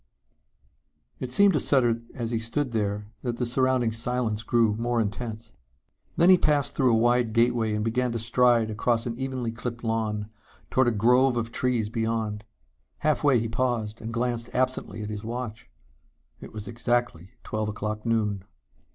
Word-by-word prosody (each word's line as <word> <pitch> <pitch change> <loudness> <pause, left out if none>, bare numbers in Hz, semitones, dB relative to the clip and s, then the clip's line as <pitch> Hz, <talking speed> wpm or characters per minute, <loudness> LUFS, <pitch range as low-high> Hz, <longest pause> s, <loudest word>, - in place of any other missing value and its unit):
_ - - -42 1.2
It 125 - -5
seemed 200 +7 +5
to 150 - +2
Sutter 120 -4 +2
as 120 -2 -3
he 115 - 0
stood 125 +4 -1
there 105 -1 -2
that 120 -2 -3
the 125 - -1
surrounding 125 -1 +1
silence 115 -1 -2
grew 115 -2 +2
more 120 +1 0
intense. 110 +1 -4 0.6
Then 175 +3 +6
he 185 - +7
passed 145 -2 +1
through 130 -3 +3
a 115 - +4
wide 120 0 +2
gateway 115 -2 +2
and 105 0 -1
began 125 +2 0
to - - -1
stride 115 -1 +3
across 115 +2 0
an 120 -1 -3
evenly 130 -3 -2
clipped 120 +1 -6
lawn 110 -2 -1 0.4
toward 130 -1 +3
a - - +4
grove 125 +4 +3
of 115 0 -2
trees 120 -4 0
beyond. 110 -2 -2 0.6
Halfway 145 -4 +3
he 115 - -2
paused 115 -2 -2
and 115 - -5
glanced 120 0 -1
absently 125 -5 -1
at 105 - -5
his 105 0 -5
watch. 115 -1 -6 0.7
It - - -10
was 105 -1 -7
exactly 120 -6 -1
twelve 110 -1 -2
o'clock 105 +1 -4
noon. 105 -4 0
115 Hz, 170 wpm, -26 LUFS, 110-125 Hz, 1.2 s, he